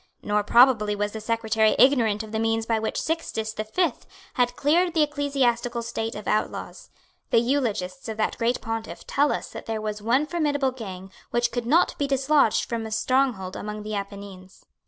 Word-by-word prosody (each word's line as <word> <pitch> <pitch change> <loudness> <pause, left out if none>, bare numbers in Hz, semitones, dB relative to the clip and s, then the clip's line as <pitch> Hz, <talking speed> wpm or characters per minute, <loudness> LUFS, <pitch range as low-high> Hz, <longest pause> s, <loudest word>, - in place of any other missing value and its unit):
Nor 210 0 +1
probably 230 -3 +5
was 205 0 -1
the 220 - -6
Secretary 220 -1 +1
ignorant 230 -6 +4
of 215 - -10
the 220 - -1
means 225 0 0
by 225 -1 +1
which 220 - -2
Sixtus 225 -9 -2
the 215 - -3
Fifth 285 +6 -1 0.3
had 245 -1 +1
cleared 340 +4 +2
the 315 - +5
ecclesiastical 265 -5 0
state 225 0 -4
of 210 - -7
outlaws. 215 - -2 0.4
The - - +3
eulogists 235 -3 -1
of 220 - -5
that 215 - 0
great 235 +1 0
pontiff 225 0 -5
tell 285 +1 +2
us - - -4
that - - -9
there 225 -1 -2
was 215 -1 -4
one 245 +7 +2
formidable 295 -5 0
gang 190 -6 -8 0.2
which 240 0 +1
could 240 -1 -3
not 330 +7 +3
be 285 - +1
dislodged 275 -3 +2
from 230 -2 -3
a - - -9
stronghold 225 -5 0
among 210 0 -5
the 215 0 -5
Apennines. 200 -2 -8
230 Hz, 185 wpm, -25 LUFS, 215-270 Hz, 0.4 s, probably